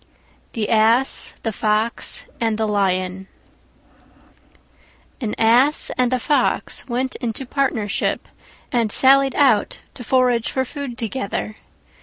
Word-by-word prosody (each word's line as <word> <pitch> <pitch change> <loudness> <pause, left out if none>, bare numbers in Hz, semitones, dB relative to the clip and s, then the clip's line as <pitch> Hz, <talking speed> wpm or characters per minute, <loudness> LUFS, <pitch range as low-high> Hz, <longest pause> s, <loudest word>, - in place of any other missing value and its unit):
THE 215 -3 -2
ASS, 230 +4 +2
THE 225 - -1
FOX, 215 +2 -1
AND 225 -2 0
THE 220 -1 -1
LION 190 -2 -1 1.9
An 220 -4 -3
Ass 245 +7 +4
and 250 -1 +1
a 255 - +2
Fox 290 +2 0
went 255 +1 -2
into 240 +2 -4
partnership 250 -6 -1 0.4
and 230 -3 0
sallied 270 +1 +4
out 255 -8 +2
to 245 - -9
forage 245 -2 +1
for 260 0 -1
food 270 -3 -7
together. 220 -2 -4
235 Hz, 115 wpm, -20 LUFS, 215-260 Hz, 1.9 s, Ass